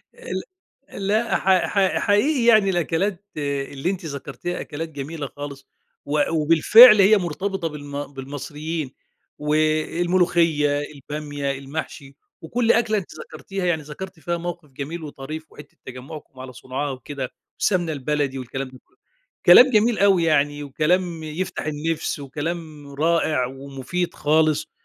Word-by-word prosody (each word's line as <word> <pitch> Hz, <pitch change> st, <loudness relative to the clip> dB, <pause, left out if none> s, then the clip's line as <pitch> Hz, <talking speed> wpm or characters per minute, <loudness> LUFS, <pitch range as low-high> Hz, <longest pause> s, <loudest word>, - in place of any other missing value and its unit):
ال 475 Hz, 0 st, -5 dB, 0.7 s
لأ، 220 Hz, +3 st, +2 dB
حق 190 Hz, -1 st, +3 dB
حق 195 Hz, -2 st, +1 dB
حقيقي 235 Hz, +5 st, +2 dB
يعني 215 Hz, -4 st, +6 dB
الأكلات 185 Hz, +3 st, -1 dB
اللي 140 Hz, +2 st, -2 dB
أنتِ 185 Hz, -3 st, -4 dB
ذكرتيها 145 Hz, +4 st, -5 dB
أكلات 160 Hz, +2 st, -6 dB
جميلة 145 Hz, 0 st, -6 dB
خالص، 140 Hz, -1 st, -9 dB, 0.4 s
وأ 145 Hz, 0 st, +1 dB
وبالفعل 165 Hz, +8 st, +7 dB
هي 210 Hz, +2 st, +6 dB
مرتبطة 185 Hz, +1 st, -2 dB
بالم 145 Hz, -1 st, -7 dB
بالمصريين 145 Hz, +2 st, -5 dB, 0.5 s
والملوخية، 155 Hz, 0 st, +1 dB
البامية، 145 Hz, -1 st, -5 dB
المحشي، 140 Hz, 0 st, -6 dB, 0.3 s
وكل 230 Hz, +8 st, +1 dB
أكلة 220 Hz, -2 st, +2 dB
أنتِ 190 Hz, -, -5 dB
ذكرتيها، 195 Hz, -2 st, -6 dB
يعني 165 Hz, -3 st, +1 dB
ذكرتِ 175 Hz, +4 st, -9 dB
فيها 170 Hz, +1 st, -2 dB
موقِف 170 Hz, -3 st, -6 dB
جميل 150 Hz, +5 st, -6 dB
وطريف 155 Hz, +2 st, -8 dB
وحتّة 150 Hz, -1 st, -14 dB
تجمّعكم 130 Hz, +1 st, -10 dB
على 130 Hz, -1 st, -8 dB
صُنعها 130 Hz, +5 st, -4 dB
وكده 130 Hz, 0 st, -6 dB, 0.3 s
والسمنة 175 Hz, -5 st, +1 dB
البلدي 140 Hz, -1 st, -2 dB
والكلام 130 Hz, +2 st, -5 dB
ده 130 Hz, 0 st, -15 dB
كُلّه. -, -, -35 dB, 0.5 s
كلام 260 Hz, +1 st, +9 dB
جميل 220 Hz, +1 st, +3 dB
أوي 195 Hz, -4 st, +4 dB
يعني 145 Hz, -2 st, +1 dB
وكلام 165 Hz, +4 st, 0 dB
يفتح 155 Hz, +2 st, -4 dB
النِفْس 155 Hz, 0 st, -2 dB
وكلام 150 Hz, +1 st, -5 dB
رائع 155 Hz, -3 st, +1 dB
ومفيد 135 Hz, +6 st, -4 dB
خالص، 155 Hz, 0 st, +1 dB
155 Hz, 130 wpm, -23 LUFS, 145-175 Hz, 0.7 s, كلام